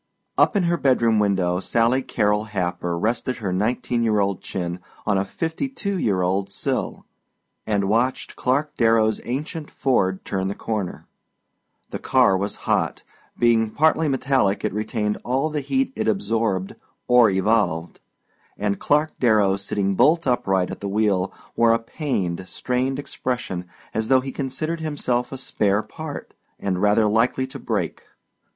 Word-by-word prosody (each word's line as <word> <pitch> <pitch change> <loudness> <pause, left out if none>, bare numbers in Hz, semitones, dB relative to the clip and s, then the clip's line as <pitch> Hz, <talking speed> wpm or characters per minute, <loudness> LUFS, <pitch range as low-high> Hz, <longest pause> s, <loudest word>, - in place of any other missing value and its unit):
Up - - +4
in 200 - +3
her 170 0 +2
bedroom 120 -6 +3
window 95 -3 +1
Sally 115 +6 +2
Carrol 105 -3 0
Happer 90 -4 -2
rested 115 +6 -1
her 100 -6 -3
nineteen 120 +4 0
year 110 -2 +2
old 100 -1 0
chin 90 -1 -4 0.3
on 105 -2 +2
a - - +1
fifty 165 - -3
two 200 -7 -3
year 95 - +1
old 95 +2 0
sill - - -3 0.6
and 100 -2 +1
watched 120 +5 0
Clark 145 +4 0
Darrow's 115 -2 +3
ancient 150 +5 -4
Ford 95 -8 0
turn 95 -1 -1
the 100 - -3
corner. 105 -5 -4 0.9
The - - -4
car 125 -7 +4
was 100 +2 -2
hot - - 0 0.3
being 115 -2 +3
partly 160 +5 +2
metallic 130 -7 +1
it - - -1
retained 105 0 -2
all 135 +5 0
the 150 -1 -1
heat 265 - 0
it - - -2
absorbed 110 - 0 0.3
or 125 -2 +6
evolved 95 -4 +1 0.6
and 100 -1 -1
Clark 150 +2 +2
Darrow 105 -5 +4
sitting 100 0 -1
bolt 155 - +4
upright 95 -8 +1
at - - -7
the 100 - -3
wheel 100 -2 +1 0.2
wore 115 -1 +5
a - - +4
pained, 105 - -3
strained 130 +6 -1
expression 125 -10 -4 0.3
as 110 0 -1
though 130 +1 +5
he 135 +1 -5
considered 150 +5 -3
himself 135 -6 -1
a 135 - -5
spare 105 -5 0
part, 145 +7 -8 0.3
and 95 -2 -1
rather 105 +1 +4
likely 115 +5 +2
to 130 - -9
break. - - -2
115 Hz, 155 wpm, -23 LUFS, 100-130 Hz, 0.9 s, or